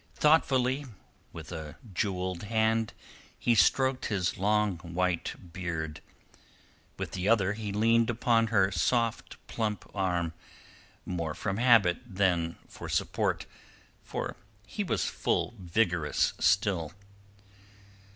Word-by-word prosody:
Thoughtfully, 140 -3 +3 0.4
with 80 0 -9
a 80 -3 -7 0.2
jewelled 90 -1 -1
hand, 110 0 +1 0.4
he 120 - +2
stroked 130 +6 +3
his 95 -4 0
long 105 -1 +1
white 85 0 -3
beard; 80 -4 -4 1.0
with - - -4
the 95 +2 -1
other 105 -3 +3
he 105 -1 -5
leaned 115 +3 +3
upon 115 -1 +2
her 100 -3 +3
soft 115 +2 0
plump 105 -3 -3
arm, 90 -3 0 0.7
more 85 -4 -3
from 95 -1 -2
habit 115 -7 +5
than 95 -6 0
for - - -9
support, - - 0 0.6
for - - -4 0.3
he 205 - -3
was 190 - 0
full - - -1
vigorous 90 -4 +1
still. 90 -4 +2
100 Hz, 110 wpm, -29 LUFS, 90-115 Hz, 1.0 s, habit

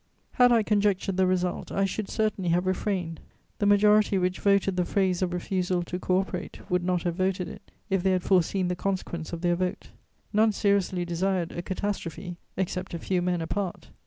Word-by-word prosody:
Had 245 -1 +5
I 230 -2 +4
conjectured 200 -2 +1
the 190 -1 +4
result, 180 -1 -1
I 195 - +1
should 195 +1 -3
certainly 210 -5 0
have 175 +2 +2
refrained; 185 -3 -1 0.4
the 205 - +2
majority 210 0 +5
which 180 0 0
voted 200 -1 +2
the 180 - +2
phrase 185 -1 0
of 185 -1 0
refusal 180 0 -1
to 180 +1 -5
co 185 0 +2
operate 185 -2 -6
would 180 -1 +2
not 180 -1 0
have 175 - 0
voted 185 0 -1
it, 205 0 -11 0.2
if 195 -3 +1
they 190 +1 +2
had 180 -1 0
foreseen 185 0 +2
the 180 - -1
consequence 175 -3 -3
of 170 -1 -5
their 175 -1 +2
vote. 180 +1 -3 0.4
None 215 +1 +4
seriously 195 -3 +1
desired 175 0 -1
a 175 - -4
catastrophe, 180 -2 -4 0.2
except 185 -1 -2
a - - -2
few 180 +2 -1
men 175 -1 0
apart. 170 - -4
185 Hz, 190 wpm, -27 LUFS, 175-195 Hz, 0.4 s, Had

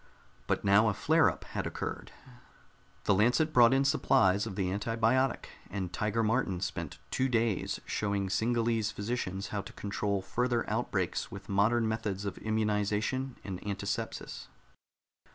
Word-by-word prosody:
But - - 0
now 100 +3 +5
a - - 0
flareup - - +3
had - - -4
occurred. - - -5 0.9
The - - +3
Lancet 125 - +3
brought 120 -1 +7
in 135 +1 +3
supplies 100 -6 +3
of 100 - -6
the 95 -2 -1
antibiotic, 115 +5 +1 0.2
and 95 -2 -4
Tiger 105 +5 0
Martin 110 -5 +1
spent 90 - -4
two 130 +1 +1
days 115 -4 0
showing 100 -2 -1
Singallese 115 +1 +1
physicians 100 -2 -3
how 105 - -2
to 100 - -11
control 100 -1 -2
further 120 +4 0
outbreaks - - -1
with - - -10
modern 110 +4 +3
methods 105 -3 -2
of 100 - -4
immunization 110 +4 0
and 95 -2 -6
antisepsis. 100 0 -4
105 Hz, 135 wpm, -31 LUFS, 100-115 Hz, 0.9 s, brought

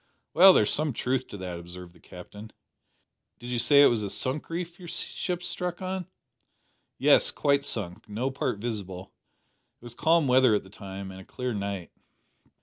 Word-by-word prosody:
"Well, 190 +3 +9
there's 105 - +3
some 150 -2 +1
truth 130 +3 -2
in 100 - -8
that," 90 -2 -5
observed 90 0 -10
the 85 - -21
Captain. 105 +6 -12 0.9
"Did 120 +1 -8
you 120 - 0
say 140 +4 +6
it - - +8
was 115 -3 +1
a 100 - -3
sunk 130 +8 -3
reef 170 +1 -5
your 180 - -10
ship 175 +1 -3
struck 180 0 -4
on?" 185 -1 -4 0.9
"Yes; - - +5
quite 140 - +1
sunk. 95 -6 -4
No 120 +6 -2
part 130 -4 -2
visible. 100 -4 -6 0.7
It - - -25
was 120 - -9
calm 160 +3 +2
weather 130 -3 +5
at 105 - -1
the 95 - -16
time, 95 -1 -8
and 95 0 -10
a - - -12
clear 125 +5 -4
night." 100 -3 -4
120 Hz, 180 wpm, -27 LUFS, 100-155 Hz, 0.9 s, Well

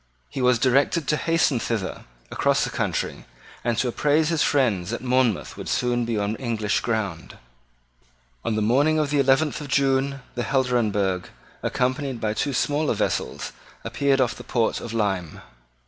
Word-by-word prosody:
He 135 - -3
was 125 -1 +4
directed 135 +5 +2
to 150 - +3
hasten 155 -5 +2
thither 110 -5 -3 0.3
across - - +2
the - - -2
country, - - -2 0.4
and 120 -1 0
to 130 - +1
apprise 150 +5 +2
his 165 -3 +1
friends 110 -11 +2
that 120 +2 -4
Monmouth 125 -5 +1
would - - -7
soon 120 -1 +1
be 115 -1 -1
on 105 +1 -1
English 110 -4 -1
ground. 100 -8 -3 1.1
On 115 - -1
the 110 - 0
morning 140 +8 +3
of 150 -2 0
the 145 - +2
eleventh 140 +3 +2
of 145 - -6
June 135 0 +1
the 120 - -3
Helderenbergh, 110 -9 +1 0.4
accompanied 130 0 -1
by 105 -1 -1
two 140 +6 -1
smaller 145 +3 0
vessels, - - -2 0.3
appeared 140 -1 +1
off 125 -3 +2
the 125 - -10
port 115 -1 0
of 115 - -6
Lyme. 95 -7 -1
125 Hz, 165 wpm, -24 LUFS, 110-140 Hz, 1.1 s, was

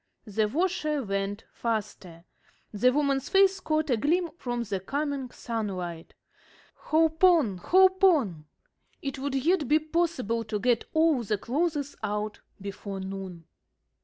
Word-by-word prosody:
The 215 0 0
washer 305 - 0
went 195 0 -3
faster. 200 -7 -4 0.5
The 250 +5 +3
woman's 275 -1 0
face 390 0 +4
caught 310 -4 0
a 240 - +3
gleam 330 - +1
from 240 -6 -3
the 200 -4 -3
coming 280 +4 -3
sunlight. 190 -9 -5 0.6
"Hope 320 +1 0
on! 320 - +5
Hope 375 - +4
on!" 230 - +3 0.6
It 275 -1 -4
would 275 0 -2
yet 300 +2 +1
be 300 - +5
possible 310 -8 -1
to 215 -1 -2
get 240 +2 +1
all 315 -5 +4
the 210 -2 -1
clothes 290 - -1
out 210 +1 -3 0.2
before 200 0 -6
noon. 190 -3 -7
255 Hz, 135 wpm, -27 LUFS, 205-315 Hz, 0.6 s, on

